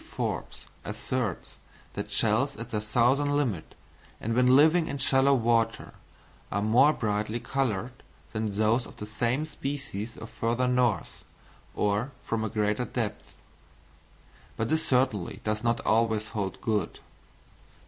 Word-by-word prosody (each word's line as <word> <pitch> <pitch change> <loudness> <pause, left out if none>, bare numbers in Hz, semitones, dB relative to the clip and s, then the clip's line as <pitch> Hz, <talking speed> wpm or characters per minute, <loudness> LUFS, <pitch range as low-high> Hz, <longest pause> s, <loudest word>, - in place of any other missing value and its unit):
Forbes - - -3 0.2
asserts 120 -8 -3 0.4
that - - -5
shells 120 +6 +2
at 115 +1 -7
their 105 -2 -1
southern 130 +7 +2
limit, 115 - -2 0.4
and 115 - -2
when 125 +2 +5
living 160 +4 +5
in 140 - -3
shallow 135 +1 +4
water, 115 -2 +1 0.6
are 100 +1 0
more 125 +7 +5
brightly 110 -3 -1
coloured 125 -4 -1 0.4
than 110 -2 -2
those 110 +3 +2
of - - -14
the 105 - -6
same 120 +7 0
species 135 -7 -5
from - - -9
further 115 +3 -1
north 125 -4 0 0.5
or 105 +6 0
from 115 -1 -1
a 110 - -1
greater 105 +3 0
depth; 115 -2 -4 1.2
but 115 +1 -1
this 160 0 +2
certainly 125 - +1
does 110 +1 -1
not 115 0 +1
always 110 -1 +1
hold 100 -3 -3
good. 110 -2 -1
115 Hz, 135 wpm, -28 LUFS, 105-130 Hz, 1.2 s, when